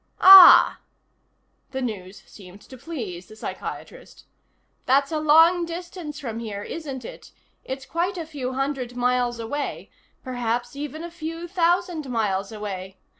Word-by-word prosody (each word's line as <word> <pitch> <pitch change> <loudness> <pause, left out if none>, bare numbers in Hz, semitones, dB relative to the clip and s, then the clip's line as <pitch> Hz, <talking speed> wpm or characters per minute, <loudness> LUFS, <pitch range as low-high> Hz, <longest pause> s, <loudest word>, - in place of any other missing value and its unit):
"Ah." 380 -2 +9 0.9
The 265 - -3
news 200 -4 -6
seemed 195 0 -15
to 260 - -14
please 230 - -7
the 215 - -14
psychiatrist. - - -9 0.6
"That's 275 +3 +2
a 310 - -1
long 325 +3 +5
distance 340 -3 -7
from 230 -6 -6
here, 205 -3 -6
isn't 275 -5 -7
it? - - -11 0.3
It's 265 0 -7
quite 360 +3 -2
a 335 - -5
few 275 -5 -5
hundred 265 -2 -3
miles 245 -1 0
away. 280 +6 -5 0.3
Perhaps 245 0 -3
even 295 +2 -6
a 345 - -7
few 330 0 -7
thousand 350 -4 0
miles 205 -4 -2
away. 195 -3 -7
265 Hz, 135 wpm, -23 LUFS, 225-325 Hz, 0.9 s, Ah